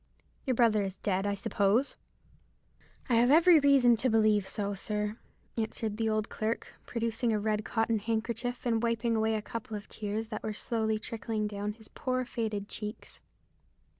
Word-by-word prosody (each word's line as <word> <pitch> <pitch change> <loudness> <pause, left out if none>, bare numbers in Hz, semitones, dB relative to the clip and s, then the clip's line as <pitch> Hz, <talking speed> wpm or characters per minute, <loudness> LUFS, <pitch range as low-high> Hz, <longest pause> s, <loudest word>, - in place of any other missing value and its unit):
Your 255 - +2
brother 225 -3 +4
is 195 -1 -3
dead, 195 -1 0
I 200 - 0
suppose." 215 +4 +1 1.1
"I 235 - +3
have 240 +2 +5
every 330 +3 +7
reason 275 -4 +5
to 255 +4 +2
believe 215 -3 +3
so, 205 0 -2
sir," 210 +2 -3 0.4
answered 220 -1 -2
the 225 -1 +1
old 215 0 0
clerk, 220 +2 -3
producing 230 0 -1
a 215 - +1
red 215 0 0
cotton 225 0 0
handkerchief 230 +3 -2
and 230 -2 +2
wiping 230 0 +1
away 220 0 +2
a 215 - -2
couple 220 -1 -5
of 205 - -10
tears 215 +1 -4
that 215 -2 -4
were 215 - -3
slowly 220 0 -1
trickling 220 0 -3
down 205 0 -3
his 220 0 -16
poor 255 -1 -2
faded 215 -4 -3
cheeks. 210 0 -7
220 Hz, 165 wpm, -30 LUFS, 210-235 Hz, 1.1 s, every